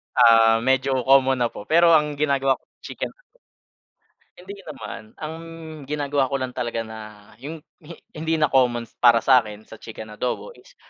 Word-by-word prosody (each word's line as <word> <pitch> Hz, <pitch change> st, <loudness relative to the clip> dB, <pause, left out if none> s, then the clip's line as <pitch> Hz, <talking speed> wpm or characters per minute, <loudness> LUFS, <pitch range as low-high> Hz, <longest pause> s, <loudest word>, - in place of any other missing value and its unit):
Ah, 115 Hz, 0 st, +5 dB
medyo 130 Hz, 0 st, +1 dB
common 135 Hz, 0 st, +4 dB
na 120 Hz, -, -1 dB
po. 105 Hz, -, -10 dB
Pero 170 Hz, +1 st, +5 dB
ang 150 Hz, -2 st, +3 dB
ginagawa 140 Hz, -2 st, +1 dB
ko -, -, -41 dB, 0.2 s
chicken. -, -, -6 dB, 1.3 s
Hindi 195 Hz, +2 st, -11 dB
naman. 130 Hz, -6 st, -9 dB
Ang 155 Hz, 0 st, -5 dB, 0.6 s
ginagawa 145 Hz, -2 st, -1 dB
ko 140 Hz, -, -1 dB
lang 130 Hz, -1 st, -4 dB
talaga 120 Hz, -2 st, -2 dB
na 110 Hz, -2 st, -12 dB
yung 155 Hz, +4 st, -8 dB, 0.2 s
hi 165 Hz, +1 st, -12 dB, 0.2 s
hindi 160 Hz, +1 st, -2 dB
na 150 Hz, -, +3 dB
common 120 Hz, -3 st, +2 dB, 0.2 s
para 120 Hz, -1 st, +6 dB
sakin 110 Hz, -5 st, +2 dB
sa 110 Hz, -, -13 dB
chicken 110 Hz, -1 st, -10 dB
adobo 125 Hz, -, -4 dB
is, -, -, -20 dB
130 Hz, 160 wpm, -23 LUFS, 115-150 Hz, 1.3 s, para